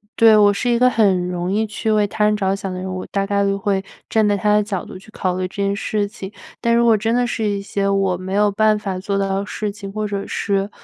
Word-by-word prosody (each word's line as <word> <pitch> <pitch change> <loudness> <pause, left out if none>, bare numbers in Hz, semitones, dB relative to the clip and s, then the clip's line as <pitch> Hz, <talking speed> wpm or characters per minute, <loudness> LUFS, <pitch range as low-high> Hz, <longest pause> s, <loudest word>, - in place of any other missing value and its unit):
对， 225 -1 +6
我 205 -1 +5
是 245 +4 -1
一 240 - +3
个 250 +1 +4
很 195 -7 +2
容 180 0 -3
易 215 +2 +1
去 220 +1 -2
为 210 -1 +3
他 210 +1 0
人 210 0 +2
着 195 -1 0
想 195 -1 -5
的 185 - -5
人， 185 - -5
我 185 - -5
大 195 -1 -1
概 200 0 +1
都 195 0 0
会 195 -1 -1 0.2
站 220 -1 +2
在 205 -1 +2
他 210 +2 +2
的 210 - +4
角 205 -3 -4
度 185 - -10
去 195 - -17
考 185 -4 -2
虑 185 - -1
这 185 - -17
件 200 0 0
事 205 0 -1
情， 200 -2 -9 0.3
但 235 0 +2
如 235 0 +3
果 230 -1 +5
真 225 +2 0
的 245 0 +2
是 240 -2 -3
一 200 -1 -1
些 200 0 -2
我 195 -2 +1
没 185 +1 -6
有 205 0 +3
办 215 +1 +3
法 195 -3 -4
做 200 +1 -2
到 195 0 0
的 200 - -4
事 210 0 -3
情， 200 -1 -9
或 215 +1 -3
者 200 -1 -4
是 200 -1 -1
200 Hz, 305 characters per minute, -20 LUFS, 195-215 Hz, 0.3 s, 对